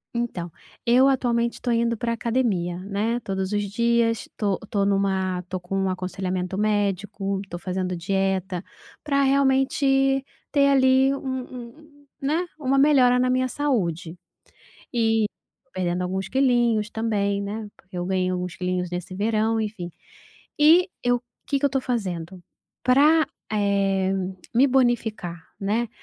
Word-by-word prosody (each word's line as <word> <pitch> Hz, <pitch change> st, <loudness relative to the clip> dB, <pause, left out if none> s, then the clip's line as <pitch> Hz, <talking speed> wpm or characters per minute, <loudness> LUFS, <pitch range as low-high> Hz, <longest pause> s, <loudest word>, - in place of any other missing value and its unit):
Então 190 Hz, -8 st, -3 dB, 0.3 s
eu 250 Hz, +3 st, +5 dB
atualmente 235 Hz, -3 st, +1 dB
estou 240 Hz, -2 st, -2 dB
indo 235 Hz, 0 st, +1 dB
pra 235 Hz, 0 st, -1 dB
academia, 225 Hz, -8 st, 0 dB
né, 205 Hz, +5 st, -1 dB
todos 190 Hz, -2 st, -3 dB
os 205 Hz, 0 st, 0 dB
dias, 235 Hz, 0 st, +1 dB
estou 200 Hz, -3 st, -2 dB
estou 200 Hz, -2 st, -1 dB
numa 190 Hz, -2 st, +1 dB
estou 185 Hz, +1 st, -5 dB
com 175 Hz, +2 st, -5 dB
um 195 Hz, -1 st, +1 dB
aconselhamento 185 Hz, 0 st, -3 dB
médico, 200 Hz, -1 st, -1 dB
estou 175 Hz, -3 st, -8 dB
fazendo 185 Hz, 0 st, -2 dB
dieta, 190 Hz, 0 st, -1 dB, 0.4 s
para 280 Hz, -2 st, +2 dB
realmente 270 Hz, 0 st, +3 dB, 0.3 s
ter 280 Hz, -2 st, +4 dB
ali 265 Hz, 0 st, +4 dB
um -, -, -5 dB, 0.6 s
um, 300 Hz, -2 st, -20 dB, 0.2 s
né, 310 Hz, +6 st, 0 dB
uma 270 Hz, -1 st, +1 dB
melhora 270 Hz, -3 st, +5 dB
na 255 Hz, -, +2 dB
minha 255 Hz, 0 st, +2 dB
saúde 185 Hz, -, -1 dB, 0.8 s
e 225 Hz, -2 st, +2 dB, 0.5 s
perdendo 180 Hz, -1 st, -1 dB
alguns 190 Hz, +1 st, -3 dB
quilinhos 240 Hz, -5 st, +2 dB
também, 205 Hz, -3 st, 0 dB
né, 210 Hz, +2 st, -5 dB
porque 190 Hz, -1 st, -13 dB
eu 175 Hz, -, -2 dB
ganhei 185 Hz, 0 st, 0 dB
alguns 180 Hz, -1 st, -3 dB
quilinhos 180 Hz, -1 st, -2 dB
nesse 180 Hz, +1 st, -5 dB
verão, 220 Hz, +2 st, +1 dB
enfim. 205 Hz, -5 st, -4 dB, 0.7 s
E, 330 Hz, +5 st, +6 dB, 0.2 s
eu 245 Hz, 0 st, +2 dB, 0.2 s
que 280 Hz, -, +1 dB
que -, -, -2 dB
eu -, -, +3 dB
estou 270 Hz, 0 st, 0 dB
fazendo 185 Hz, -7 st, -3 dB, 0.4 s
para, 295 Hz, +5 st, +5 dB, 0.3 s
eh, 195 Hz, -2 st, +1 dB, 0.4 s
me 255 Hz, +4 st, +6 dB
bonificar, 235 Hz, -8 st, +1 dB, 0.2 s
né, 215 Hz, +4 st, 0 dB
215 Hz, 140 wpm, -24 LUFS, 190-255 Hz, 0.8 s, E